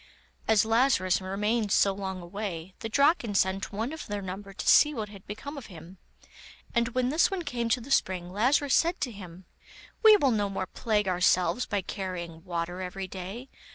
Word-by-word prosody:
As 220 -1 +4
Lazarus 225 -6 +2
remained 210 +3 -1
so 195 0 +4
long 190 -1 -5
away, 185 -2 -6
the 225 - -5
Draken 280 - +2
sent 190 +2 +1
one 225 +7 -3
of 320 - -7
their 205 -1 -4
number 195 +2 -7
to 195 - -7
see 300 0 +6
what 215 -3 -4
had 200 -2 -13
become 280 +8 -7
of 255 - -12
him, 175 0 -12 0.7
and 235 -1 +2
when 255 -1 +1
this 310 +5 +3
one 385 -3 -3
came 240 -6 -2
to 250 +2 +2
the 265 +4 -10
spring, 180 -7 +1
Lazarus 260 +7 +2
said 340 +2 +2
to 250 - -1
him: 185 -3 -11 0.6
'We 435 -2 +8
will 275 -8 +2
no 205 -3 0
more 195 -1 -3
plague 210 -1 -1
ourselves 180 +5 +2
by 200 -1 -1
carrying 175 -4 -6
water 175 0 -4
every 185 +1 -5
day. 195 +8 -7
205 Hz, 190 wpm, -28 LUFS, 185-240 Hz, 0.7 s, We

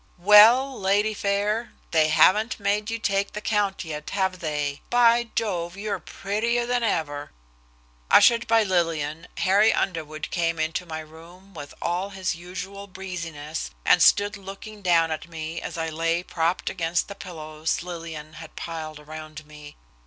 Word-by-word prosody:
"Well, 220 +8 +7
lady 205 +3 +2
fair, 205 +3 -1 0.2
they 160 -2 +4
haven't 190 +9 +4
made 205 +1 0
you 230 - -2
take 200 -2 -1
the 210 - -4
count 205 -3 0
yet, 150 -1 -6
have 190 -2 -1
they? 150 -3 -3
By 240 -1 +4
Jove, 180 -5 -2
you're 205 0 -3
prettier 230 +4 -1
than 245 0 0
ever." 145 -9 -2 0.8
Ushered 235 0 +6
by 225 -1 +4
Lillian, 165 -4 -1
Harry 205 +4 +4
Underwood 155 -4 -3
came 165 -1 0
into 160 +3 -2
my 160 -1 -5
room 170 +5 -15
with 145 -4 -9
all 180 +3 -1
his 190 -3 -2
usual 190 +3 -8
breeziness, 170 - -6 0.2
and - - +5
stood 205 +1 +4
looking 200 +2 -10
down 165 -3 +3
at 155 - -4
me 160 0 -5
as - - -6
I 165 0 -2
lay 165 +2 -1
propped 170 0 -1
against 170 -1 -1
the 200 - -7
pillows 160 -5 -4
Lillian 165 -3 -7
had 165 0 -11
piled 160 -2 -6
around 155 0 -9
me. 150 -1 -13
180 Hz, 155 wpm, -25 LUFS, 160-205 Hz, 0.8 s, Well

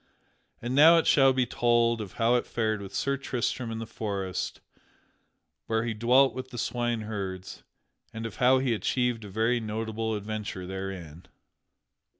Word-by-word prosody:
And 120 +1 -2
now 160 +5 +8
it 165 - +2
shall 135 -2 +5
be 130 -1 +1
told 120 -1 +2
of 100 -4 -7
how 115 +1 +2
it 125 - +1
fared 110 -2 -1
with 95 - -8
Sir 140 0 0
Tristram 125 -2 -2
in 115 - -4
the 115 - -5
forest 100 -4 -4 1.1
where 110 0 +1
he 115 - -1
dwelt 125 +5 +4
with 130 0 -6
the 125 - -9
swineherds, 110 -6 -3 0.5
and 115 0 -6
of 115 - -7
how 130 0 +5
he 130 -2 +1
achieved 120 +1 0
a 105 - -8
very 115 +5 +1
notable 110 0 -3
adventure 105 -3 -5
therein. 95 -4 -7
115 Hz, 155 wpm, -28 LUFS, 105-125 Hz, 1.1 s, now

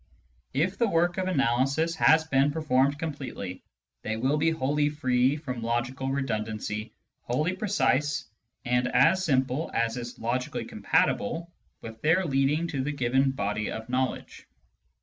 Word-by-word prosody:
If 170 +7 0
the 235 -2 +3
work 175 +1 +1
of 185 - -1
analysis 135 +1 +1
has 160 0 +5
been 140 -2 +2
performed 140 -2 +1
completely, 140 - -5 0.4
they 110 +1 -3
will 135 +6 +1
be 165 +2 +2
wholly 150 -1 +1
free 130 -3 +1
from 130 -6 -5
logical 120 +3 -2
redundancy, 110 -5 -3 0.3
wholly 150 +9 -1
precise, 150 -8 +1 0.4
and 125 +1 +1
as 165 +10 +4
simple 135 -1 0
as 115 +1 0
is 120 0 -6
logically 125 +3 -2
compatible 170 +10 0 0.3
with 110 0 -9
their 165 +5 +3
leading 145 +3 +1
to 135 -4 -2
the 145 - -1
given 135 -1 +2
body 105 -4 -2
of 110 +1 -6
knowledge. 130 +1 -3
135 Hz, 140 wpm, -27 LUFS, 125-155 Hz, 0.4 s, has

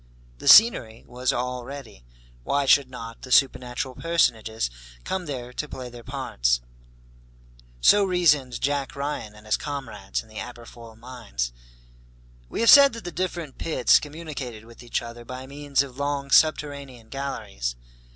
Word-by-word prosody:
The - - -7
scenery 120 - +6
was 125 +1 -1
all 125 0 -3
ready, 130 - -10 0.4
why 140 - 0
should 135 -1 +5
not 115 -2 -9
the 130 - -10
supernatural 130 -1 +2
personages 115 - 0 0.3
come 190 -2 -3
there 125 -3 -6
to 150 +3 -4
play 125 -1 -7
their 120 -1 -11
parts? - - 0 1.2
So 205 - +6
reasoned 155 -9 +2
Jack 140 0 -1
Ryan 140 -7 -4
and 105 0 -16
his 110 - +1
comrades 115 -9 -5
in - - -21
the 110 -1 -9
Aberfoyle 120 -1 -10
mines. 115 - -5 1.0
We - - -3
have 230 - +7
said 280 -1 +9
that 230 - -8
the 175 - -5
different 175 -6 -4
pits 165 - +4
communicated 145 -7 -7
with 115 0 -15
each 120 -1 -3
other 120 0 -9
by 130 +2 -8
means 140 0 0
of 135 -1 -11
long 140 -1 -2
subterranean 140 -4 +1
galleries. 85 - -4
130 Hz, 150 wpm, -25 LUFS, 115-145 Hz, 1.2 s, said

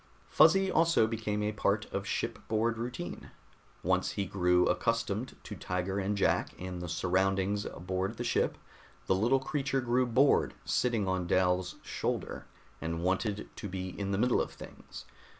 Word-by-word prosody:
Fuzzy 195 -1 +5
also 165 -8 +4
became 110 -2 -2
a 105 - 0
part 105 0 0
of 100 +1 -2
shipboard 115 +1 -1
routine. 120 -7 -5 0.5
Once 90 +1 +1
he 100 - -1
grew 90 -1 +3
accustomed 115 0 0
to - - -7
Tiger 90 +2 -2
and 100 +1 -1
Jack 95 - +1
and 90 -1 -5
the 90 - -5
surroundings 95 +4 +1
aboard 95 +4 -3
the 120 - -3
ship, - - +1 0.5
the - - +3
little 115 +8 +3
creature 135 0 -1
grew 125 0 +1
bored 130 +4 +3
sitting 115 -5 +1
on 95 -1 -1
Dal's 90 0 +2
shoulder - - -3 0.3
and 85 +1 -3
wanted 100 +3 0
to 105 - -6
be 95 0 -4
in 100 +2 -4
the 100 - 0
middle 125 +3 +3
of - - -3
things. - - -11
100 Hz, 155 wpm, -31 LUFS, 95-115 Hz, 0.5 s, Fuzzy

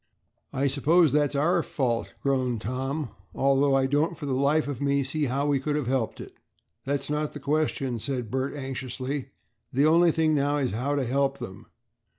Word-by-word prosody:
"I 135 +1 0
suppose 150 +4 +4
that's 145 0 +2
our 170 +5 +2
fault," 125 -6 -2
groaned 130 -4 +1
Tom, 130 +5 -3 0.2
"although 135 0 +3
I 135 -1 +3
don't 150 +5 +1
for 150 - -6
the 140 - -1
life 140 +4 +2
of 140 -3 -4
me 140 0 +2
see 150 +3 -1
how 135 +2 -1
we 145 -2 +2
could 145 +2 -2
have 150 -3 -1
helped 125 -2 -1
it." - - -9 0.5
"That's 140 +1 -1
not 150 0 -2
the 145 - -7
question," 140 -4 -1
said 125 -3 -3
Bert, 130 +2 -1
anxiously, 135 0 -4 0.4
"the 140 +3 +3
only 165 +2 +5
thing 160 0 +2
now 145 0 +1
is 135 -3 0
how 130 +7 -1
to 140 - 0
help 135 +2 +1
them." 105 -4 -9
140 Hz, 185 wpm, -26 LUFS, 130-145 Hz, 0.5 s, only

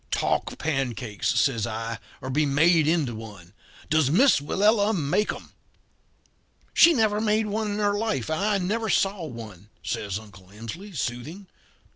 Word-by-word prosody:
"'Talk - - -1
pancakes,' 120 -6 -1
says 115 -4 +1
I, 115 0 -4 0.2
'or 130 - -5
be 150 +4 +2
made 155 +3 +3
into 155 -7 +1
one. 105 -6 -10 0.3
Does 155 -3 +2
Miss 240 - +5
Willella 210 +7 +2
make 160 +7 +1
'em?' - - -10 1.2
"'She 340 0 +7
never 215 -5 +1
made 215 0 +2
one 210 +1 -2
in - - -3
her 205 -1 +1
life 205 - -1
and 160 +5 -1
I 210 -1 +2
never 215 +4 -1
saw 195 -2 +1
one,' 105 - -10
says 100 -2 -3
Uncle 95 -4 -14
Emsley, 155 - -9
soothing. 140 +12 -4
155 Hz, 150 wpm, -25 LUFS, -, 1.2 s, She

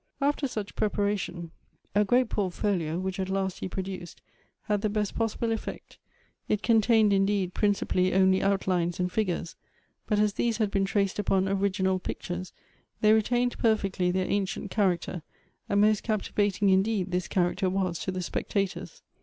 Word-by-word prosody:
After 285 0 +1
such 215 -5 -5
preparation, 200 -5 -1 0.4
a 205 +1 +4
great 245 +4 +3
portfolio, 185 -5 -1
which 190 +1 -3
at 190 0 -2
last 190 -1 -1
he - - -3
produced, 185 -2 -6 0.4
had 210 -2 0
the 215 - 0
best 210 -1 -1
possible 225 0 -1
effect. 225 - -6 0.5
It 210 -1 0
contained 220 -2 +4
indeed, 195 -2 +1
principally 190 -3 +1
only 190 0 +4
outlines 185 -3 0
and 180 0 0
figures, 180 -5 -2 0.5
but 210 - +1
as 210 -1 +2
these 230 0 0
had 215 -3 0
been 195 -1 +1
traced 195 0 0
upon 190 -1 +1
original 190 -1 +1
pictures, 180 0 -5 0.5
they 215 0 +6
retained 245 +3 +1
per 225 -2 +4
fectly 190 -3 -1
their 185 0 0
ancient 200 0 -2
character, 185 -4 0 0.5
and 200 - +2
most 210 0 +4
captivating 205 -2 +1
indeed 190 -1 +1
this 180 0 -1
character 185 +1 +1
was 185 -2 -1
to 190 - -3
the 185 -1 -3
spectators. 185 -2 -3
195 Hz, 155 wpm, -28 LUFS, 185-210 Hz, 0.5 s, they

